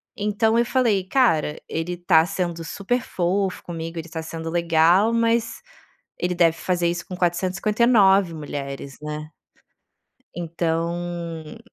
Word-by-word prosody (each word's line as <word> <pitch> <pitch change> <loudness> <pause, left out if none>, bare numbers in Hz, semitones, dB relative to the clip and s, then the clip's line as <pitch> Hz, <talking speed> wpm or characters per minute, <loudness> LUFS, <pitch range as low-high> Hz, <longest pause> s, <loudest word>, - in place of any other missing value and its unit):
Então 215 +2 +1
eu 235 - +3
falei: 225 -5 +2
"Cara, 185 - +2
ele 175 +2 -3
tá 165 -2 +4
sendo 170 -2 -3
super 205 +9 -2
fofo 185 +1 -1
comigo, 165 -1 -6
ele 165 +1 -5
está 160 0 -5
sendo 165 0 -6
legal, 170 +5 +3
mas 230 0 +1 0.6
ele 180 0 -1
deve 165 -2 +3
fazer 175 -1 0
isso 170 0 -3
com 185 - -6
459 190 +1 +3
mulheres, 140 -2 -6
né". 150 0 -6 1.1
Então 170 0 -3
175 Hz, 125 wpm, -23 LUFS, 165-200 Hz, 1.1 s, tá